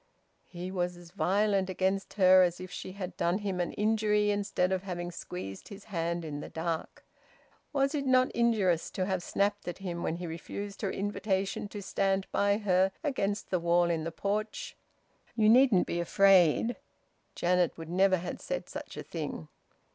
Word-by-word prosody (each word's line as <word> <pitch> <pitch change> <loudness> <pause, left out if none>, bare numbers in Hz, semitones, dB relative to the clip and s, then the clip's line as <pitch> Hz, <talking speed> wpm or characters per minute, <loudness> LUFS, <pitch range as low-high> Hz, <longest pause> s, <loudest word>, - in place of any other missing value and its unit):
He 180 +1 -6
was 180 -1 -2
as 175 -1 -14
violent 195 0 +1
against 190 +1 -1
her 185 -2 +7
as 175 -1 +2
if 185 0 -8
she 185 - -7
had 190 -2 -6
done 175 +2 +1
him 200 -3 -3
an 175 - -1
injury 210 -1 +2
instead 200 -2 0
of 190 -1 0
having 175 -2 -5
squeezed 95 - -7
his 200 0 -10
hand 170 -3 -2
in 145 -2 -5
the - - -7
dark. 165 0 -4 0.7
Was 275 0 +1
it 280 -2 -1
not 255 0 +4
injurious 210 -8 +2
to 185 - -1
have 190 -2 -1
snapped 200 +3 -1
at 175 - -4
him, 175 -3 -5
when 160 - -1
he 175 +1 -6
refused 195 +4 -6
her 200 - 0
invitation 200 0 -2
to 205 -1 -7
stand 195 0 0
by 200 0 +2
her 190 -2 +2
against 210 -9 -1
the 180 - +2
wall 170 0 +3
in 160 -2 -1
the 165 - -3
porch, 215 - -3 0.6
"You 215 -2 +3
needn't 245 -5 +6
be 170 - -2
afraid"? 190 +4 +4 0.6
Janet 180 0 +1
would 165 -1 -8
never 190 +1 +4
have 175 +1 -6
said - - -4
such - - -8
a - - -5
thing. - - -6
190 Hz, 180 wpm, -30 LUFS, 175-205 Hz, 0.7 s, her